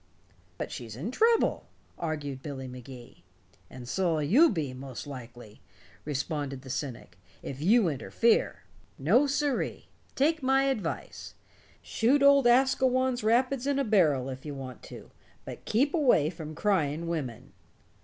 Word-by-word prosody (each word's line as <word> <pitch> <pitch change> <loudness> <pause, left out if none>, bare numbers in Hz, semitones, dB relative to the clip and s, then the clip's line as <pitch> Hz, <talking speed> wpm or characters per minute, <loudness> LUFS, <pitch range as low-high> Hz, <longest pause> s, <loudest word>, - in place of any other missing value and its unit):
"But - - -5
she's 115 -3 -7
in 165 - -5
trouble," 455 - +2 0.3
argued 150 -5 -4
Billy 135 -2 -6
Magee. 125 -1 -11 0.5
"And 125 -1 -10
so'll 165 -1 0
you 255 - +5
be, 155 - -3
most 130 -1 -8
likely," 120 -5 -10 0.4
responded 145 -2 -3
the 130 - -7
cynic, 120 - -6 0.2
"if 135 +1 -7
you 210 +4 +4
interfere. 170 - +1 0.3
No, 225 - +3
siree! 280 -1 -2 0.3
Take 315 +3 +2
my 270 +1 +3
advice. 230 -11 -3 0.5
Shoot 270 +5 +2
old 280 -2 +6
Asquewan's 260 0 +2
rapids 250 +4 +1
in 285 -1 +1
a 275 - +1
barrel 160 - +2
if 130 0 -7
you 145 -2 -6
want 130 -2 -8
to, - - -11 0.3
but - - -9
keep 275 +7 +1
away 245 - +3
from 155 -2 -8
crying 165 -4 0
women." 145 -9 -5
165 Hz, 135 wpm, -28 LUFS, -, 0.5 s, old